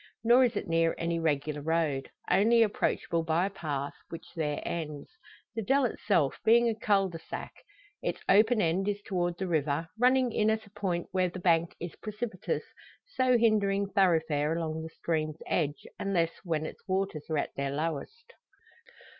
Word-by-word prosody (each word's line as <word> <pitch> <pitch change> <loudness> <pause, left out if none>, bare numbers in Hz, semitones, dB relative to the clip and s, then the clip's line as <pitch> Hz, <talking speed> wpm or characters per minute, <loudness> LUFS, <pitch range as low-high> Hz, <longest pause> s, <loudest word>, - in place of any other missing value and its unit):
Nor 245 +3 +6
is 245 - -1
it - - -3
near 165 0 +2
any 170 0 -1
regular 150 -2 -1
road; 155 -3 0 0.2
only 225 +5 +5
approachable 170 -5 0
by 165 +2 +1
a 200 - -3
path, 145 -6 -3 0.2
which 165 0 -8
there 150 -3 -1
ends; 155 - -4 0.4
the 225 - -2
dell 270 +6 +3
itself 195 - +1
being 235 +2 +5
a 230 - +2
cul 205 -3 +2
de 170 -3 -7
sac. - - -7 0.5
Its - - -2
open 215 +2 +5
end 175 +4 +1
is 205 0 0
toward 175 -3 -1
the 190 - -2
river, 160 -1 0
running 255 0 +4
in 215 0 +2
at 220 0 0
a 200 - -18
point 185 -4 -2
where 185 -1 +1
the 180 - -8
bank 170 -2 +2
is 175 0 -6
precipitous, 215 -2 -4 0.5
so 255 -1 +3
hindering 200 -3 +2
thoroughfare 160 -5 +2
along 160 -1 -3
the 160 - -6
stream's 155 -2 -2
edge, 150 -3 -1
unless 170 -4 +1
when 160 -3 -1
its - - -8
waters 190 -5 -2
are 155 - 0
at - - -2
their 140 0 -2
lowest. 165 - -4
175 Hz, 170 wpm, -29 LUFS, 160-210 Hz, 0.5 s, Nor